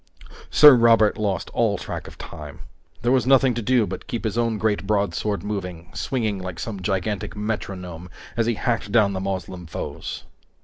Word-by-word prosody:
Sir 150 Hz, -2 st, +9 dB
Robert 115 Hz, -3 st, +5 dB
lost 100 Hz, -5 st, -1 dB
all -, -, +1 dB
track -, -, -6 dB
of -, -, -12 dB
time. 75 Hz, -3 st, -9 dB, 0.4 s
There 120 Hz, -, +2 dB
was 130 Hz, -1 st, +2 dB
nothing 135 Hz, -1 st, +5 dB
to 120 Hz, -, -3 dB
do 120 Hz, 0 st, +3 dB
but 95 Hz, 0 st, -7 dB
keep 120 Hz, -, -4 dB
his 110 Hz, -2 st, -2 dB
own 115 Hz, -2 st, +1 dB
great 105 Hz, -3 st, 0 dB
broadsword 100 Hz, 0 st, 0 dB
moving, 90 Hz, -4 st, -5 dB
swinging 110 Hz, -7 st, -1 dB
like 90 Hz, -2 st, -6 dB
some 105 Hz, -4 st, -5 dB
gigantic 95 Hz, +2 st, -2 dB
metronome 90 Hz, -5 st, -5 dB, 0.3 s
as 115 Hz, -1 st, +1 dB
he 120 Hz, -, +1 dB
hacked 115 Hz, +2 st, -1 dB
down 105 Hz, -4 st, +4 dB
the 95 Hz, -, -2 dB
Moslem 95 Hz, -2 st, -4 dB
foes. -, -, -6 dB
105 Hz, 175 wpm, -23 LUFS, 95-115 Hz, 0.4 s, Sir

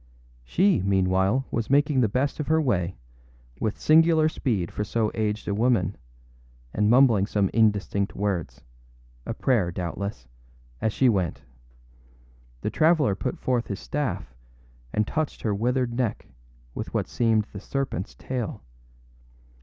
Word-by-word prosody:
She, 185 Hz, -, +2 dB
meanwhile, 95 Hz, +5 st, +2 dB
was 115 Hz, -2 st, -2 dB
making 145 Hz, -1 st, +3 dB
the 110 Hz, -, +2 dB
best 135 Hz, +8 st, -1 dB
of 150 Hz, -, -3 dB
her 160 Hz, 0 st, +3 dB
way, 95 Hz, -, 0 dB, 0.6 s
with 110 Hz, -1 st, -2 dB
singular 160 Hz, 0 st, +5 dB
speed 110 Hz, -, -2 dB
for 105 Hz, -, -3 dB
so 110 Hz, 0 st, 0 dB
aged 105 Hz, -1 st, -2 dB
a 100 Hz, -, 0 dB
woman, 105 Hz, -4 st, +1 dB, 0.8 s
and 105 Hz, 0 st, +2 dB
mumbling 120 Hz, -5 st, +5 dB
some 100 Hz, -3 st, 0 dB
indistinct 105 Hz, -2 st, +1 dB
wordsâa 100 Hz, -5 st, -2 dB, 0.7 s
prayer, 110 Hz, -10 st, +1 dB
doubtlessâas 90 Hz, -5 st, -5 dB, 0.6 s
she 130 Hz, +5 st, +2 dB
went. 90 Hz, -, 0 dB, 1.2 s
The -, -, -2 dB
traveller 155 Hz, -, +3 dB
put 95 Hz, -, -3 dB
forth 125 Hz, -2 st, -1 dB
his 100 Hz, -, -4 dB
staff 145 Hz, -, -3 dB, 0.6 s
and 105 Hz, -, +1 dB
touched 155 Hz, +5 st, -3 dB
her 110 Hz, -, +1 dB
withered 120 Hz, +3 st, 0 dB
neck 120 Hz, -3 st, -2 dB, 0.5 s
with -, -, -6 dB
what -, -, 0 dB
seemed 110 Hz, -3 st, +1 dB
the 100 Hz, -, -6 dB
serpentâs 130 Hz, -4 st, -4 dB
tail. 120 Hz, -5 st, -4 dB
110 Hz, 130 wpm, -25 LUFS, 100-130 Hz, 1.2 s, singular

